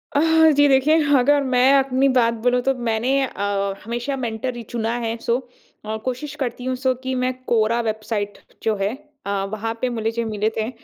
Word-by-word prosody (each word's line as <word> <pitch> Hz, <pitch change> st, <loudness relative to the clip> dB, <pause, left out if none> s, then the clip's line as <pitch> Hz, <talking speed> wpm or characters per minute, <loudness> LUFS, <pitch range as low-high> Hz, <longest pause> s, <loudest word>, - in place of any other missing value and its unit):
अह, 320 Hz, +1 st, +5 dB
जी। 290 Hz, 0 st, +5 dB
देखिए 275 Hz, +3 st, +4 dB, 0.2 s
अगर 285 Hz, +3 st, +3 dB
मैं 255 Hz, 0 st, +4 dB
अपनी 270 Hz, 0 st, +2 dB
बात 230 Hz, -1 st, +3 dB
बोलूँ 250 Hz, 0 st, +3 dB
तो 270 Hz, -, +2 dB
मैंने 225 Hz, +3 st, 0 dB, 0.2 s
अ, 200 Hz, -4 st, -2 dB
हमेशा 240 Hz, +5 st, -3 dB
मेंटर 240 Hz, 0 st, -3 dB
ही 240 Hz, -, -6 dB
चुना 230 Hz, 0 st, -2 dB
है 230 Hz, -1 st, -2 dB
सो 235 Hz, -, 0 dB, 0.5 s
और 215 Hz, +1 st, -3 dB
कोशिश 265 Hz, +4 st, -4 dB
करती 250 Hz, -3 st, -4 dB
हूँ 255 Hz, -, -1 dB
सो 260 Hz, 0 st, +1 dB
कि 260 Hz, 0 st, -2 dB
मैं 255 Hz, 0 st, 0 dB
कोरा 230 Hz, 0 st, +2 dB
वेबसाइट 215 Hz, -1 st, -3 dB, 0.3 s
जो 220 Hz, -1 st, +1 dB
है 200 Hz, +4 st, 0 dB, 0.3 s
अ, -, -, -4 dB, 0.2 s
वहाँ 220 Hz, +1 st, -3 dB
पे 255 Hz, -, +1 dB
मिले 225 Hz, -1 st, -2 dB
ज 235 Hz, -, -6 dB
मिले 215 Hz, 0 st, 0 dB
थे। 220 Hz, +1 st, -1 dB
240 Hz, 195 wpm, -22 LUFS, 220-260 Hz, 0.5 s, अह